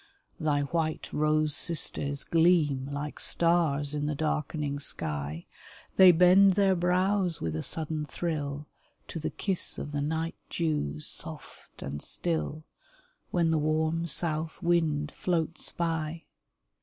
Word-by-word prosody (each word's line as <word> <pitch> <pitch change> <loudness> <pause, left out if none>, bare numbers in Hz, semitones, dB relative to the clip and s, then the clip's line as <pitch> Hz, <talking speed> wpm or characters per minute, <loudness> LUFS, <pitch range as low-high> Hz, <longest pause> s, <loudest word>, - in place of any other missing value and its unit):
Thy 150 -3 +1
white 155 +2 -3
rose 155 0 +2
sisters 140 -3 +1
gleam 160 -5 +2
Like 145 +1 -5
stars 160 -4 +2
in 145 0 -2
the 150 - -2
darkening 150 -1 -2
sky; 75 - -2 0.5
They 185 -1 +8
bend 180 +3 +6
their 195 -1 +3
brows 180 0 +1
with 80 -1 -3
a 80 - -2
sudden 155 - 0
thrill 145 -2 -4 0.4
To 165 - -5
the 155 - -3
kiss 195 -3 0
of 145 - -6
the 145 -1 -2
night 160 +3 -2 0.2
dews 75 - -1
soft - - -5
and 70 +1 -5
still, 160 -2 -3 0.7
When 170 -2 +1
the 160 - +2
warm 155 +2 0
south 160 0 +1
wind 155 -4 +1
floats 165 -2 -2
by. 165 -1 -3
155 Hz, 130 wpm, -28 LUFS, 145-170 Hz, 0.7 s, They